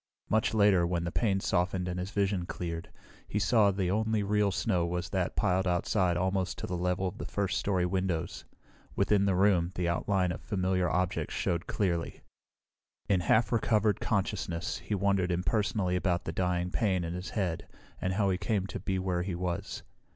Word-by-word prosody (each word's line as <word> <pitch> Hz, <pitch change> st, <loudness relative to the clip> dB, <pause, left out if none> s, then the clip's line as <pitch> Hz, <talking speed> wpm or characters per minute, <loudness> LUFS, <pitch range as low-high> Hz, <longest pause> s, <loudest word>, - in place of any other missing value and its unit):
Much 110 Hz, +1 st, +2 dB
later, 100 Hz, -4 st, +5 dB
when 85 Hz, 0 st, 0 dB
the 85 Hz, -, -3 dB
pain 100 Hz, -3 st, +1 dB
softened 90 Hz, 0 st, 0 dB
and 90 Hz, 0 st, -3 dB
his 90 Hz, +1 st, -3 dB
vision 100 Hz, -3 st, 0 dB
cleared, 85 Hz, -1 st, -5 dB, 0.4 s
he -, -, -2 dB
saw 105 Hz, +1 st, +4 dB
the 95 Hz, -2 st, 0 dB
only 110 Hz, 0 st, +1 dB
real 105 Hz, 0 st, +2 dB
snow 95 Hz, -3 st, 0 dB
was 90 Hz, +1 st, -2 dB
that 95 Hz, -2 st, -1 dB
piled 95 Hz, +1 st, +1 dB
outside 90 Hz, 0 st, +1 dB
almost 95 Hz, 0 st, 0 dB
to -, -, -4 dB
the 90 Hz, -, -3 dB
level 90 Hz, +2 st, 0 dB
of 95 Hz, +3 st, -6 dB
the -, -, -4 dB
first 100 Hz, -2 st, -1 dB
story 95 Hz, -3 st, +1 dB
windows. 90 Hz, -2 st, -2 dB, 0.5 s
Within 100 Hz, 0 st, +3 dB
the 95 Hz, -2 st, +2 dB
room, 90 Hz, -3 st, +3 dB
the 90 Hz, -1 st, -1 dB
outline 90 Hz, +2 st, +1 dB
of -, -, -6 dB
familiar 95 Hz, -2 st, 0 dB
objects 90 Hz, +2 st, -1 dB
showed 85 Hz, -1 st, -1 dB
clearly. 85 Hz, -5 st, -1 dB, 0.9 s
In 95 Hz, -2 st, +4 dB
half 110 Hz, +6 st, +2 dB
recovered 110 Hz, -3 st, +2 dB
consciousness 95 Hz, -4 st, -2 dB
he 105 Hz, -, -3 dB
wondered 95 Hz, -2 st, +1 dB
impersonally 90 Hz, +2 st, 0 dB
about 90 Hz, -1 st, 0 dB
the -, -, -2 dB
dying 90 Hz, 0 st, -1 dB
pain 95 Hz, -6 st, +1 dB
in 85 Hz, 0 st, -3 dB
his 90 Hz, +2 st, -5 dB
head 90 Hz, -6 st, -2 dB, 0.3 s
and 90 Hz, -, 0 dB
how 100 Hz, 0 st, +2 dB
he 90 Hz, -, -1 dB
came 100 Hz, -3 st, 0 dB
to 95 Hz, -, -5 dB
be 95 Hz, -, -2 dB
where 90 Hz, -1 st, -1 dB
he 90 Hz, 0 st, -3 dB
was. 90 Hz, 0 st, -3 dB
95 Hz, 185 wpm, -30 LUFS, 90-100 Hz, 0.9 s, later